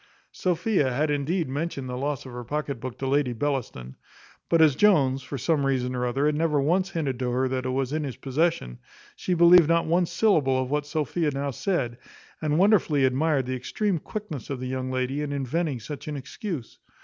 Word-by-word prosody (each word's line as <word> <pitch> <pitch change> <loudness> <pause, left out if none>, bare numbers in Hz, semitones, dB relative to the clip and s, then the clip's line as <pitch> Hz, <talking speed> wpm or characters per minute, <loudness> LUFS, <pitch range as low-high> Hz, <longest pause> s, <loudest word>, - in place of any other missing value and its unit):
Sophia 180 -5 0
had 150 +4 0
indeed 155 +4 0
mentioned 140 -1 -3
the 125 - -4
loss 140 +1 -3
of 130 - -9
her 120 0 -6
pocket 145 +1 -3
book 125 0 -6
to 135 - -4
Lady 135 -2 +1
Bellaston; 120 - -3 0.5
but 165 - +4
as 155 -4 +5
Jones, 135 -10 +3
for 140 +2 -6
some 150 +2 +1
reason 130 -2 0
or 125 0 -1
other, 135 +4 0
had 150 - +3
never 150 -1 +1
once 180 +7 +1
hinted 145 -8 -2
to 125 -1 -1
her 130 +2 +1
that 130 0 -2
it - - -1
was 130 +1 -1
in 155 0 -1
his 135 -5 -5
possession, 140 - -1 0.4
she 180 - -1
believed 170 -1 +7
not 170 0 +3
one 170 +2 +2
syllable 150 -13 +2
of 130 0 -3
what 145 0 -1
Sophia 155 +1 -1
now 140 0 -2
said, 130 - -2 0.4
and 150 -1 +1
wonderfully 175 -8 +4
admired 135 +1 +1
the 130 - -3
extreme 180 - -1
quickness 180 - -6
of 135 -3 -3
the 130 - -4
young 130 0 -3
lady 130 +2 -1
in 150 -1 -3
inventing 140 +1 -1
such 145 +7 -8
an 150 -1 -3
excuse. 135 - -6
140 Hz, 205 wpm, -26 LUFS, 130-160 Hz, 0.5 s, believed